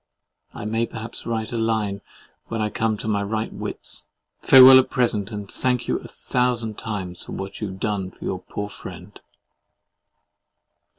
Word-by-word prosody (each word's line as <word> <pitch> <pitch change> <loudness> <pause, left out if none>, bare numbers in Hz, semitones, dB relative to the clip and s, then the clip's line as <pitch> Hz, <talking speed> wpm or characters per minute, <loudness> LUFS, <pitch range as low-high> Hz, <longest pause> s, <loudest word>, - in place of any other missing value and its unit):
I - - -7
may 115 +2 0
perhaps 110 +1 -8
write 110 -1 -2
a 115 - -1
line 110 -3 0 0.5
when 115 - -3
I 105 -1 0
come 110 -1 0
to 110 - -6
my 105 -2 +1
right 110 +2 -2
wits.—Farewel 130 0 +5
at 130 - +1
present, 110 -4 +1
and 105 -2 -5
thank 125 +3 -1
you - - 0
a - - -10
thousand 120 -3 -1
times 95 -5 -5
for - - -8
what 95 +2 -6
you 105 - -1
have 95 0 -8
done 100 -3 -1
for - - -11
your 95 - -2
poor 105 +3 -5
friend. - - -10
110 Hz, 165 wpm, -23 LUFS, 100-115 Hz, 0.5 s, wits.—Farewel